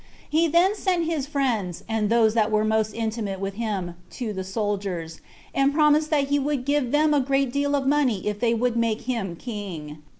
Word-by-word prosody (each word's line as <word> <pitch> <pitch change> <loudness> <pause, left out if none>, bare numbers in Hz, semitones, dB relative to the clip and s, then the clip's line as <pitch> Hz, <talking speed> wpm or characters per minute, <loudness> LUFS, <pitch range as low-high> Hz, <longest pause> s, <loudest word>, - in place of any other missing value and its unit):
He 325 +2 +2
then 345 +5 +4
sent 365 -5 0
his 315 -4 -2
friends, 235 - -1
and 220 -2 0
those 225 -2 +4
that 220 -2 +2
were 215 -1 +2
most 220 0 +1
intimate 220 -4 -3
with 195 0 -3
him, 200 -5 -3 0.2
to 230 -5 -3
the 190 -1 -4
soldiers, 190 -5 -3 0.3
and 275 +1 +3
promised 305 0 +4
that 285 -3 +1
he 285 0 +2
would 280 -2 -1
give 285 -3 +1
them 300 +1 +3
a 290 - +4
great 270 -1 0
deal 285 0 +1
of 275 -1 -1
money 270 -8 +1
if 210 -1 -2
they 235 0 +2
would 240 +1 0
make 230 -1 0
him 225 -9 -3
king. 170 -9 -7
235 Hz, 200 wpm, -24 LUFS, 205-285 Hz, 0.3 s, then